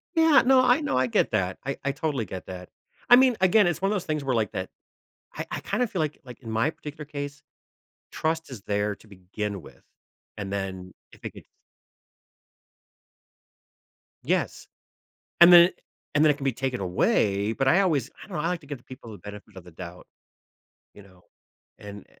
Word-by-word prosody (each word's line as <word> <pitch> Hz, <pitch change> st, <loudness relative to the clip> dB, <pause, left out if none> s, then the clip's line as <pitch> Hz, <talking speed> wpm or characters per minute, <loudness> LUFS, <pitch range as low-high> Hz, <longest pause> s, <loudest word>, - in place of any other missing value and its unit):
Yeah, 320 Hz, -3 st, +6 dB
no, 260 Hz, 0 st, +6 dB
I 255 Hz, +3 st, +4 dB
no, 290 Hz, -, -1 dB
I 130 Hz, 0 st, +2 dB
get -, -, +1 dB
that, 95 Hz, 0 st, 0 dB
I 140 Hz, -, -3 dB
I 140 Hz, -, 0 dB
totally 140 Hz, -5 st, -2 dB
get 95 Hz, 0 st, -8 dB
that. 90 Hz, -1 st, -8 dB, 0.4 s
I 245 Hz, -, +10 dB
mean, 255 Hz, -2 st, +4 dB
again, 190 Hz, +1 st, +5 dB
it's 175 Hz, -1 st, -1 dB
one 195 Hz, +1 st, +1 dB
of -, -, +1 dB
those 190 Hz, -, -3 dB
things 155 Hz, -2 st, -2 dB
where, 130 Hz, -3 st, 0 dB
like, 110 Hz, -3 st, 0 dB
that 95 Hz, 0 st, -4 dB, 0.7 s
I -, -, -5 dB
I -, -, -4 dB
kind 215 Hz, +5 st, -1 dB
of 240 Hz, -, 0 dB
feel 180 Hz, -, -2 dB
like 155 Hz, -1 st, -2 dB
like, 125 Hz, -3 st, -12 dB
in 115 Hz, -4 st, -8 dB
my 110 Hz, +7 st, +1 dB
particular 150 Hz, -1 st, -9 dB
case, 145 Hz, -1 st, -7 dB, 0.7 s
trust 160 Hz, +1 st, -2 dB
is 125 Hz, -6 st, -9 dB
there 105 Hz, 0 st, -1 dB
to -, -, -20 dB
begin 100 Hz, +1 st, -6 dB
with, -, -, -16 dB, 0.5 s
and 100 Hz, -2 st, -5 dB
then 95 Hz, -2 st, -5 dB, 0.2 s
if -, -, -19 dB
it -, -, -5 dB
gets -, -, -14 dB, 2.8 s
Yes, -, -, -1 dB, 0.7 s
and 175 Hz, +1 st, +10 dB
then 175 Hz, +1 st, +9 dB, 0.4 s
and 145 Hz, +2 st, +4 dB
then 155 Hz, -, +6 dB
it 145 Hz, -, +1 dB
can 140 Hz, -, -7 dB
be 135 Hz, -, +1 dB
taken 130 Hz, 0 st, -3 dB
away, 100 Hz, +3 st, +1 dB
but 135 Hz, +3 st, 0 dB
I 175 Hz, +8 st, +5 dB
always 150 Hz, -, +1 dB
I -, -, -10 dB
don't 195 Hz, -, -7 dB
know, 150 Hz, -, -1 dB
I 165 Hz, -, 0 dB
like 180 Hz, -1 st, -2 dB
to 145 Hz, -, -17 dB
give 145 Hz, -2 st, -6 dB
the 120 Hz, -, -26 dB
people 130 Hz, -4 st, -11 dB
the 105 Hz, -, -10 dB
benefit 105 Hz, +1 st, -11 dB
of 90 Hz, -, -10 dB
the 90 Hz, -, -13 dB
doubt. 90 Hz, +1 st, -10 dB, 0.9 s
You 105 Hz, -, -14 dB
know, 95 Hz, -2 st, -21 dB, 0.6 s
and 100 Hz, -1 st, -10 dB
135 Hz, 205 wpm, -26 LUFS, 100-165 Hz, 2.8 s, I